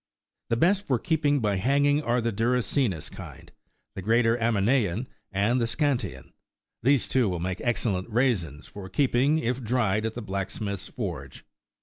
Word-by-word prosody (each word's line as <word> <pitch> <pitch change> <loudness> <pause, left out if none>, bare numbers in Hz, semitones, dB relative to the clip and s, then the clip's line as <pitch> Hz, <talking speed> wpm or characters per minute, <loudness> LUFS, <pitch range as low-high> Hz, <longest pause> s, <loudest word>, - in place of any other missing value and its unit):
28 - - -58
The 115 - +1
best 195 +5 +2
for 130 - +2
keeping 145 +1 +1
by 105 -3 +1
hang 140 +8 +2
ing, 145 +1 +3
are 120 -3 +1
the 115 0 0
duracinus 115 - 0
kind, - - -11 0.4
the - - -6
greater 115 +3 +3
Aminean, 115 -1 +1 0.3
and 110 +6 +1
the - - +2
Seantian;29 140 +2 -1 0.5
these, 135 +1 +3
too, 125 -6 +2
will 90 -2 -2
make 90 +1 -3
excellent 110 -5 -1
raisins 105 - 0
for 100 -2 -9
keeping 140 +4 +2
if 125 -3 -1
dried 110 -3 +1
at 110 - -6
the 120 - -5
blacksmith's 100 0 -4
forge." - - -6
115 Hz, 160 wpm, -26 LUFS, 100-130 Hz, 0.5 s, ing